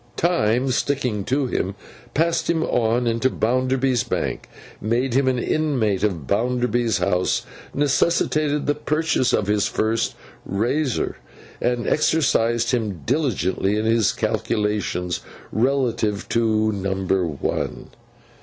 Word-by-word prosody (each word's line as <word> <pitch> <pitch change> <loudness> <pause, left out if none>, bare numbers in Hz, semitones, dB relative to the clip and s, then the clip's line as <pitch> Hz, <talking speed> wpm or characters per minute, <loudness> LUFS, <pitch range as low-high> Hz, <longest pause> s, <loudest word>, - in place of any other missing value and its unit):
Time, 130 -8 +2
sticking 125 -6 0
to 135 +2 +1
him, 100 -5 -2 0.4
passed 165 +2 +1
him 165 -1 +2
on 120 -1 +1
into 115 +2 +1
Bounderby's 130 +1 +1
Bank, - - -3 0.3
made 120 +4 0
him 135 +1 +2
an 130 -1 +2
inmate 120 -8 0
of 90 -9 -1
Bounderby's 120 - +1
house, 90 0 0 0.3
necessitated 145 +1 +1
the 145 - +2
purchase 150 -3 0
of 105 - +1
his 105 0 +1
first 110 +1 0 0.3
razor, 120 +8 -1 0.4
and 120 0 0
exercised 120 -7 +2
him 110 -8 -1
diligently 105 - 0
in 110 - -1
his 115 -1 +3
calculations 100 -4 -1 0.3
relative 115 -4 0
to 110 -2 +2
number 95 -1 0
one. 75 -4 -3
120 Hz, 115 wpm, -22 LUFS, 105-135 Hz, 0.4 s, his